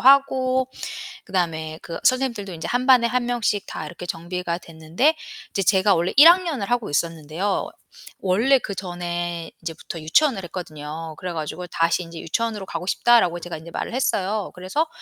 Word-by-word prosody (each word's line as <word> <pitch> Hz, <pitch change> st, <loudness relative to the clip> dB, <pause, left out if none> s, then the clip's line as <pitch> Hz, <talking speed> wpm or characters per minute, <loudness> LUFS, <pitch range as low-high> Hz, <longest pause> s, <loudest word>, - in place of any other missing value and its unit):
하고 260 Hz, -1 st, +4 dB, 0.6 s
그다음에 160 Hz, -4 st, -2 dB
그 165 Hz, -, -6 dB
선생님들도 240 Hz, -7 st, +1 dB
이제 165 Hz, 0 st, -5 dB
1 250 Hz, +1 st, 0 dB
반에 255 Hz, -3 st, +6 dB
1 250 Hz, 0 st, 0 dB
명씩 235 Hz, -4 st, 0 dB
다 155 Hz, -, -6 dB
이렇게 170 Hz, +3 st, -8 dB
정비가 175 Hz, 0 st, -3 dB
됐는데 165 Hz, -, 0 dB, 0.3 s
이제 195 Hz, -, -1 dB
제가 190 Hz, +1 st, +4 dB
원래 170 Hz, +2 st, 0 dB
1 300 Hz, +4 st, +11 dB
학년을 335 Hz, -, +2 dB
하고 240 Hz, -2 st, 0 dB
있었는데요. 165 Hz, +5 st, -1 dB, 0.5 s
원래 225 Hz, +9 st, +3 dB
그전에 175 Hz, -4 st, -4 dB
인제부터 165 Hz, 0 st, -6 dB
유치원을 195 Hz, -, +3 dB
했거든요. 160 Hz, -2 st, -6 dB
그래 180 Hz, -1 st, -5 dB
가지고 160 Hz, +2 st, -4 dB
"다시 170 Hz, +1 st, +1 dB
인제 165 Hz, -1 st, -9 dB
유치원으로 210 Hz, +2 st, -2 dB
가고 180 Hz, -, -4 dB
싶다."라고 200 Hz, -6 st, +4 dB
제가 175 Hz, -1 st, -6 dB
인제 165 Hz, +2 st, -11 dB
말을 230 Hz, -, -4 dB
했어요. 210 Hz, -5 st, 0 dB
그래서 190 Hz, -, -1 dB
185 Hz, 370 characters per minute, -23 LUFS, 165-240 Hz, 0.6 s, 1